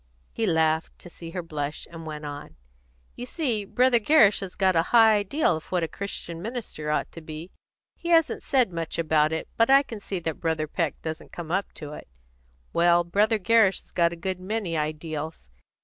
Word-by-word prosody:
He 225 -1 -1
laughed, 160 -2 +1
to 175 - -13
see 165 0 -9
her 180 +1 -5
blush, 150 -2 -4
and 165 -1 -9
went 150 -1 -6
on. 145 0 -8 0.6
"You 245 - -7
see, 245 - -1
Brother 250 +3 +3
Gerrish 230 -4 +5
has 190 -2 -7
got 190 -2 +2
a 165 - +5
high 225 -2 +6
ideal 205 - +1
of 155 - -8
what 180 -2 +1
a - - 0
Christian 170 -3 -6
minister 220 -9 -5
ought 150 - -1
to 165 - -10
be; 155 +3 -8 0.5
he 340 - -6
hasn't 330 -2 +3
said 255 - +2
much 165 -1 -4
about 155 -2 +2
it, 160 - -3
but 230 +1 +4
I 275 +1 +7
can 230 -5 -8
see 195 -1 -4
that 160 -2 -3
Brother 160 -2 0
Peck 165 -1 -2
doesn't 160 -1 -6
come 165 -2 -7
up 195 +2 0
to 150 -1 -8
it. - - -10 0.7
Well, 175 0 +4
Brother 210 +6 +2
Gerrish 210 -1 +3
has - - -21
got 170 -1 +2
a - - -5
good 185 +2 -4
many 190 -2 -3
ideals. 155 - -4
175 Hz, 200 wpm, -26 LUFS, 160-215 Hz, 0.7 s, I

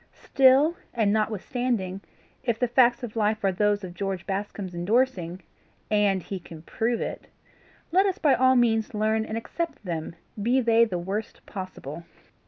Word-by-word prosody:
Still, 275 +5 +5 0.2
and 215 -3 +2
notwithstanding, 215 -2 -1 0.4
if 235 -3 0
the 245 - +1
facts 240 0 +3
of 235 -2 -6
life 215 0 0
are 195 - +3
those 205 +2 +1
of 180 -2 -6
George 190 -1 -3
Bascombe's 195 -1 -4
endorsing 180 -2 0 0.5
AND 200 -3 +2
HE 195 - -5
CAN 165 -2 -12
PROVE 230 +6 -1
IT - - -5 0.6
let 380 +3 +4
us 380 - -1
by 290 -4 +3
all 260 0 +4
means 225 -1 +2
learn 220 +1 +1
and 220 0 -4
accept 300 +1 -5
them, 165 -2 -4 0.3
be 245 +5 +3
they 230 -1 +4
the 185 -6 -3
worst 195 +5 -5
possible. 185 -5 -7
215 Hz, 160 wpm, -26 LUFS, 190-245 Hz, 0.6 s, Still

